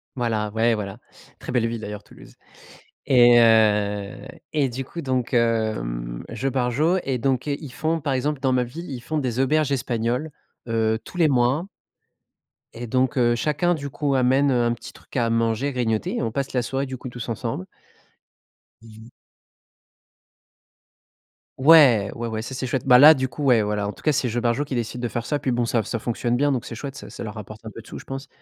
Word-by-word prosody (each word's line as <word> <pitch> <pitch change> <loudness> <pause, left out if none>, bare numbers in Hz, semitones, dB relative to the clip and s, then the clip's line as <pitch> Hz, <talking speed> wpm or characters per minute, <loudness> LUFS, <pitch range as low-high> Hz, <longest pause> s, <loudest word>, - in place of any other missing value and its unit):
Voilà. 110 -4 -1
Ouais, 115 +2 +2
voilà, 100 -2 -5 0.4
très - - -7
belle 120 -2 +1
ville 115 -1 -4
d'ailleurs, 105 -1 -7
Toulouse. - - -16 0.7
Et, 120 -3 +6
heu, 105 -3 +3 0.4
et 145 -4 +1
du 130 +3 -5
coup, 170 +6 -7
donc, 130 -1 -1
hem, - - -1
Jeux 135 +1 -2
Barjo 135 +8 +1
et 130 -2 -1
donc 130 +1 0
heu, 140 - 0
ils 140 -5 -9
font, 160 +6 -1
par 140 -1 -2
exemple, 145 +2 -1
dans 130 -1 +1
ma 125 -1 +2
ville, 160 +7 -8
ils 130 -3 -5
font 155 +5 -3
des 125 -4 -2
auberges 145 +1 +2
espagnoles, 125 +3 -1 0.4
heu, 110 -1 +1
tous - - -12
les 160 - +4
mois 130 +6 +2 1.1
et 120 +1 -7
donc 130 +3 0
heu, 120 -1 +3
chacun, 155 +7 +1
du 145 -3 -5
coup, 140 0 -1
amène, 135 +2 +3
heu, 120 -2 +2
un 120 0 +1
petit 120 - -10
truc - - -18
à 115 -1 +1
manger, 115 +4 0
grignoter 115 -3 -1
et - - -1
on 115 -2 -2
passe 135 +2 -3
la 125 - +1
soirée, 135 +3 -2
du 130 -1 -6
coup, 125 - -8
tous 120 -1 -7
ensemble. 115 -4 -4 1.2
Mmh 115 - -15 0.2
mh. 120 - -15 2.5
Ouais. 130 -8 +6
Ouais, 120 0 -4
ouais, 110 -1 -3
ça, 125 - -7
c'est 130 - -3
chouette. 130 0 -2
Bah, 125 -1 +8
là, 150 +4 +10
du 130 -3 -1
coup, 145 +3 -7
ouais, 125 -5 +4
voilà, 105 -1 -1
en - - -2
tout - - -16
cas, 155 - +3
c'est 130 -3 0
Jeux 120 - -1
Barjo 120 +4 +1
qui 140 -3 -5
décide 120 0 -3
de 120 - -1
faire 115 +1 -4
ça. 145 - 0
Puis, 130 - -1
bon, 120 0 0
ça 115 -1 0
ça 115 +3 -3
fonctionne 120 +1 -1
bien 145 +1 +2
donc 130 -4 -2
c'est 115 - -7
chouette. 135 +3 -7
Ça - - -10
ça - - -8
leur 105 - -6
rapporte 110 +1 -10
un - - -5
peu 115 - -10
de 110 - -19
sous, - - -8
je - - -14
pense. 135 0 -6
125 Hz, 215 wpm, -23 LUFS, 115-135 Hz, 2.5 s, là